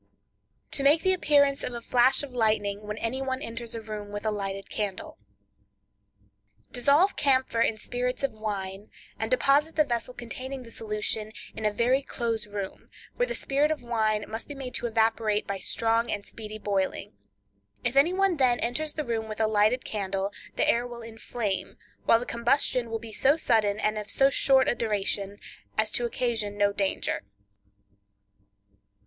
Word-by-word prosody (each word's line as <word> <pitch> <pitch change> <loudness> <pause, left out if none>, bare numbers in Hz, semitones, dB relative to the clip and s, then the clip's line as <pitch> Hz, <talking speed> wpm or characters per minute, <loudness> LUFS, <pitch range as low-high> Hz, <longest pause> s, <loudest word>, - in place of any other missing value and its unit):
To 280 - +1
Make 290 +4 +5
the 375 - +4
Appearance 285 -5 +3
of - - -3
a 235 - -4
Flash 250 +4 +3
of 280 - -7
Lightning 210 -3 0
When 210 +1 -4
Any 230 +4 -2
One 260 -1 -2
Enters 230 -1 -6
a 225 - -4
Room 215 -2 -6
with 205 +1 -5
a 215 - +2
Lighted 195 -1 -4
Candle.—Dissolve 100 - -3
camphor 260 -4 +2
in 225 -1 +2
spirits 250 +4 -3
of 275 - +1
wine, 205 -2 -5 0.3
and - - -1
deposit 300 - +3
the 305 - +5
vessel 245 -1 -3
containing 255 +2 -6
the 230 - -10
solution 215 0 -2 0.2
in 220 - 0
a - - +1
very 245 +5 +2
close 230 -5 -3
room, 200 -2 -6 0.3
where - - +1
the - - -2
spirit 285 +2 +1
of 310 -5 -2
wine 215 -3 0
must 225 +1 -6
be 290 - -7
made 265 -2 -6
to 240 - -1
evaporate 220 -2 +1
by 200 -1 -3
strong 230 +4 +1
and 205 -1 -3
speedy 215 -1 -8
boiling. 200 -3 -2 0.7
If 240 +1 0
any 285 +5 +5
one 380 -2 +2
then 250 -3 +3
enters 295 +6 -1
the 305 - -3
room 225 -2 -2
with 215 - -6
a 220 - +3
lighted 215 +3 +2
candle, 195 -1 -2 0.2
the - - +2
air 240 +1 +2
will 240 -1 -9
inflame, 225 -2 -4 0.3
while 230 - +6
the 245 - -5
combustion 240 0 +1
will 225 - -1
be 225 -1 -10
so 275 +8 +4
sudden, 210 -8 +2
and 215 0 0
of 210 - -7
so 270 0 +4
short 265 -1 +4
a - - +3
duration, 205 -3 -1 0.4
as 215 0 +2
to 240 - +1
occasion 230 -4 -1
no 205 0 +3
danger. 195 -1 -1
225 Hz, 175 wpm, -27 LUFS, 210-255 Hz, 0.7 s, while